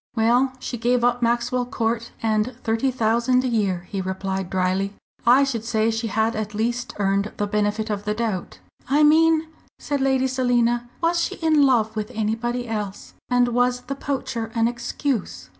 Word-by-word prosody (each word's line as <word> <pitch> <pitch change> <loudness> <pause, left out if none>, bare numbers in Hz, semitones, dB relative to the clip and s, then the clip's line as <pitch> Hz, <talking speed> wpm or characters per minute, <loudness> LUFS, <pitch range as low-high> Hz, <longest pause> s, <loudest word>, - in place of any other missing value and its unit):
"Well, 245 +4 +3
she 245 -1 -5
gave 245 +1 +2
up 245 0 +2
Maxwell 240 +1 0
Court 230 -2 -2
and 220 +2 0
thirty 225 +3 +1
thousand 240 +1 +2
a - - 0
year," 195 -7 0
he 195 -2 -2
replied 190 0 -3
drily. 190 +2 0 0.3
"I 255 +4 +7
should 245 -5 -2
say 225 -1 +1
she 225 +1 -2
had 220 +1 0
at 215 -1 -4
least 240 +3 -2
earned 200 +1 0
the 205 - 0
benefit 210 +1 -1
of 205 -1 -3
the 210 0 -1
doubt." 215 -5 -3 0.3
"I 290 +3 +4
mean," 320 +1 +5 0.3
said 285 -2 -2
Lady 265 -1 +2
Selina, 240 -2 +1
"was 340 +1 +2
she 390 - -2
in 310 -5 +3
love 225 -4 +2
with 215 -1 -3
anybody 235 +3 -1
else, 210 -3 -5 0.2
and 245 -1 +3
was 245 +1 +1
the 260 +3 -5
poacher 260 -5 -3
an 230 0 +3
excuse?" 235 - -3
235 Hz, 175 wpm, -23 LUFS, 215-250 Hz, 0.3 s, I